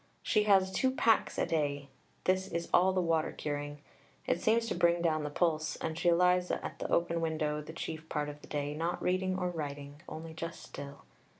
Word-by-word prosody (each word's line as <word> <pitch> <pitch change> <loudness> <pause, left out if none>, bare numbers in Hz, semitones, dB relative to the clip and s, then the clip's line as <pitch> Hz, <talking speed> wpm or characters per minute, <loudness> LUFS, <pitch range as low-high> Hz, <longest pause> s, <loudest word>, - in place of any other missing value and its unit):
She 210 -2 +2
has 190 -2 +5
two 260 +7 +2
"packs" 230 -3 +2
a - - +2
day; 145 -3 -1 0.4
this 185 +1 +2
is 170 -1 -3
all 185 +2 +6
the 185 - +1
water 165 -1 +1
curing; 145 0 -4 0.4
it 170 - 0
seems 230 +1 +3
to 230 - -1
bring 170 0 +3
down 155 -2 +2
the 150 - -2
pulse, 155 0 0
and 160 -1 -3
she 175 +1 +3
lies 180 +1 +3
at - - -3
that - - -3
open 170 0 +1
window 155 -2 -1
the 150 - -9
chief 160 0 -6
part 150 -1 -1
of 150 0 -8
the - - -13
day, 145 0 -2
not 165 +3 -2
reading 185 +1 0
or 180 -1 -1
writing, 145 -2 -6
only 160 +1 -7
just 165 +1 -6
still. 140 0 -9
165 Hz, 205 wpm, -32 LUFS, 150-180 Hz, 0.4 s, all